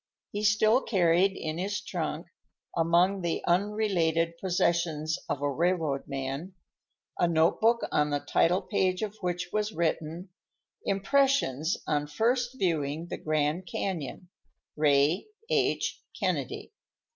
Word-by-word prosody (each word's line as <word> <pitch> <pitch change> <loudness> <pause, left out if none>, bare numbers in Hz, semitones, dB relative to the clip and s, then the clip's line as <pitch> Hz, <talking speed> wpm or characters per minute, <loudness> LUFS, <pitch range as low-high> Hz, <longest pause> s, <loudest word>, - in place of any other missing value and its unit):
He 205 +1 -3
still 215 +4 +4
carried 185 -2 +3
in 155 +1 -4
his 200 +3 -1
trunk, 165 -4 -4 0.5
among 175 +4 +3
the 170 -1 -2
unrelated 175 -4 +1
possessions 170 -4 0
of 140 - -2
a 145 - +1
railroad 160 -2 0
man, 140 +6 -4 0.6
a 175 - +4
notebook 170 +8 +3
on 150 0 +2
the 145 0 0
title 180 +6 +2
page 185 -1 0
of 210 -1 -4
which 180 -1 -2
was 215 0 0
written 165 +1 -2 0.6
"Impressions 195 - +2
on 150 -1 0
First 245 - 0
Viewing 160 - -1
the - - -4
Grand 155 +3 -1
Canyon, 180 -1 -4 0.5
Ray 150 - +3 0.2
H. - - +1 0.2
Kennedy." - - -2
175 Hz, 120 wpm, -28 LUFS, 155-195 Hz, 0.6 s, still